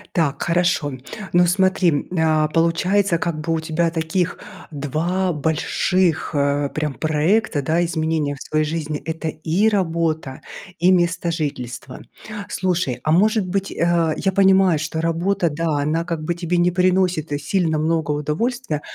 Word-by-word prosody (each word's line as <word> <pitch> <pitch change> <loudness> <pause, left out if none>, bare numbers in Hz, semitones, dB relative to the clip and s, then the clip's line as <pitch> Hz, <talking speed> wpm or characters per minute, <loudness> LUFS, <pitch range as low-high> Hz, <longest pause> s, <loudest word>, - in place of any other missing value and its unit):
Так, 150 -4 0
хорошо. 170 -5 +1 0.4
Ну 175 0 +5
смотри, 185 -3 +2
а, 155 -1 +3
получается 170 +4 +1
как 170 -2 -2
бы 165 - -3
у 165 - +1
тебя 160 +1 0
таких 165 +2 -1 0.3
2 170 +6 -1
больших, 160 +3 0
э, 140 0 +1
прям 155 -2 -2
проекта, 155 +3 +1
да, 160 +5 +1
изменения 160 -3 -1
в 135 - -15
своей 155 0 0
жизни- 155 -1 -3
это 160 0 -4
и 160 +7 0
работа, 165 -8 -1 0.4
и 175 +2 +4
местожительство. 165 -8 -2 0.5
Слушай, 175 -10 -1
а 155 - +1
может 210 +4 +3
быть, 195 +2 -2
э 170 -2 +1
я 190 - 0
понимаю, 190 -3 +4
что 160 +1 -3
работа 170 +2 0
да 155 0 -1
она 160 +3 -1
как 165 -3 -4
бы 175 - -1
тебе 175 0 -2
не 175 +1 +3
приносит, 180 -4 +1
э, 145 - 0
сильно 160 +1 0
много 160 -1 0
удовольствия, 155 - -2
165 Hz, 145 wpm, -21 LUFS, 155-180 Hz, 0.5 s, Ну